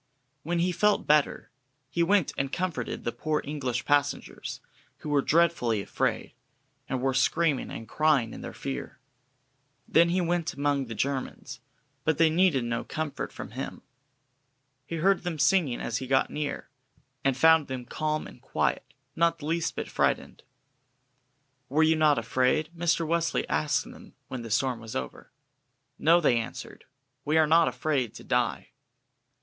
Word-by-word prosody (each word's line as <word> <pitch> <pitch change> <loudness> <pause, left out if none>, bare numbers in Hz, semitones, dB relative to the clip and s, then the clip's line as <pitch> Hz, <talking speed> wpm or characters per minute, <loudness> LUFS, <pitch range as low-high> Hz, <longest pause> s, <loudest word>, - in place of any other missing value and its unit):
When 175 +2 -2
he 175 +2 +2
felt 205 +4 +2
better, 150 -1 +2 0.4
he 170 +6 -2
went 190 0 +3
and 135 0 -2
comforted 170 -9 -3
the 120 - -1
poor 155 +3 -1
English 130 -4 -3
passengers, 145 -1 -1 0.4
who 150 - -7
were 145 -1 +3
dreadfully 150 -9 +2
afraid, 100 - -2 0.6
and 130 -1 -2
were 135 0 +2
screaming 145 +2 +1
and 115 - -7
crying 150 -7 +2
in - - -8
their - - -6
fear. 135 - -6 0.9
Then 170 +1 +4
he 180 +2 +1
went 175 -1 -1
among 140 -1 0
the 115 - -6
Germans, 135 +4 -3 0.4
but 160 -1 +1
they 160 -1 +4
needed 165 -6 +3
no 120 0 -2
comfort 155 -3 -4
from - - -8
him. - - -6 1.0
He 165 - -4
heard 190 +4 +2
them 175 -3 -3
singing 150 -3 +2
as 115 - -2
he 130 - -6
got 135 0 +2
near, 150 -3 -4 0.5
and 135 -2 +1
found 160 +1 +5
them 130 -2 -5
calm 155 +3 -2
and - - -13
quiet, - - -2 0.2
not 170 0 +2
the 150 - -9
least 165 +1 -1
bit - - -4
frightened. - - -1 1.3
"Were 155 +4 +3
you 160 0 +4
not 155 -2 +4
afraid?" 130 +6 +1
Mr. 170 0 +1
Wesley 170 +1 0
asked - - +1
them - - -14
when 130 - -5
the 115 - -7
storm 120 +2 +1
was 110 -1 -9
over. 65 -1 -6 0.7
"No," 165 +3 +5
they 130 -8 +3
answered, 115 - -8 0.4
"we 155 +2 +1
are 160 - +6
not 165 +2 +5
afraid 125 -1 -1
to - - -10
die." - - 0
150 Hz, 160 wpm, -27 LUFS, 130-165 Hz, 1.3 s, are